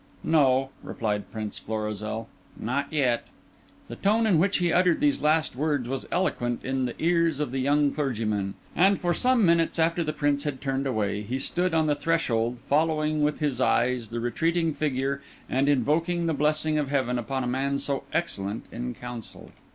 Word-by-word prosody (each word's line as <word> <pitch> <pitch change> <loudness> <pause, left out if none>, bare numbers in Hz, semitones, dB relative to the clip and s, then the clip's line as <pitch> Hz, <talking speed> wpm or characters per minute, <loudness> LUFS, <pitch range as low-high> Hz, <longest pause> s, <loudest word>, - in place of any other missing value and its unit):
"No," 135 -4 +3
replied 105 -2 -3
Prince 110 -2 -5
Florizel, 110 +1 -4 0.3
"not 135 +5 -2
yet." 130 -6 +1 0.6
The - - -7
tone 220 +3 +2
in 190 -7 +4
which 190 +3 +2
he 175 -2 +1
uttered 180 -1 +3
these 290 0 +2
last 155 -2 +2
words 145 -3 0
was 135 +1 -4
eloquent 120 -10 -1
in 130 0 0
the 120 - -4
ears 170 -3 +2
of 150 -5 -2
the 135 - -2
young 145 +2 +3
clergyman; 110 -9 -2 0.2
and 195 +3 +4
for 175 -1 +1
some 250 +1 +3
minutes 170 -1 +3
after 170 +1 +2
the 155 - -1
Prince 145 -2 0
had 145 -3 -3
turned 135 0 -1
away 105 -4 -1
he 120 +5 -3
stood 175 +5 0
on 160 -1 +3
the 150 - +2
threshold 125 -7 0
following 155 0 +1
with 150 +1 0
his 140 -4 0
eyes 120 -3 +1
the 120 - -3
retreating 165 +7 0
figure 140 -2 -1 0.3
and 135 +2 +1
invoking 165 +6 +1
the 165 - +1
blessing 155 +1 +1
of 145 -2 -2
heaven 130 -3 0
upon 130 +3 -2
a - - -2
man 135 +3 0
so 140 -1 -1
excellent 105 - -2
in 120 +1 -4
counsel. 120 -2 -9
140 Hz, 180 wpm, -26 LUFS, 120-160 Hz, 0.6 s, in